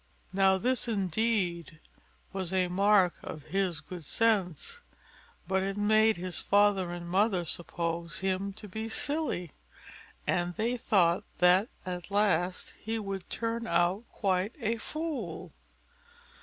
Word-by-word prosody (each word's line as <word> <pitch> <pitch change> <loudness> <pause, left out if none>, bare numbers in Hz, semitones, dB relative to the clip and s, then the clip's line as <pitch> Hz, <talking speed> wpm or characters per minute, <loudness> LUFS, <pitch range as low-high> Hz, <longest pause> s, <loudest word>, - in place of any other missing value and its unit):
Now 190 0 +4
this, 250 +5 0
indeed, 190 -5 0 0.5
was 190 -2 -3
a 185 -1 +2
mark 195 -1 +4
of 155 - -7
his 185 -3 -1
good 180 -3 -8
sense, 220 - 0 0.7
but 190 0 +2
it 195 +1 -2
made 215 +1 +4
his 180 0 -4
father 200 -3 +3
and 175 0 -6
mother 190 0 +2
suppose 170 0 -3
him 190 +1 -1
to 210 +1 -9
be 220 +3 -5
silly, 265 - -1 0.7
and 175 -1 0
they 230 +3 0
thought 185 -7 +2
that 180 +6 +5 0.2
at 180 0 -5
last 185 -3 +1
he 225 +1 -2
would 195 -4 -5
turn 230 0 -2
out 175 +5 +2
quite 195 +2 0
a 230 -1 0
fool. 275 - -4
195 Hz, 130 wpm, -30 LUFS, 175-220 Hz, 0.7 s, that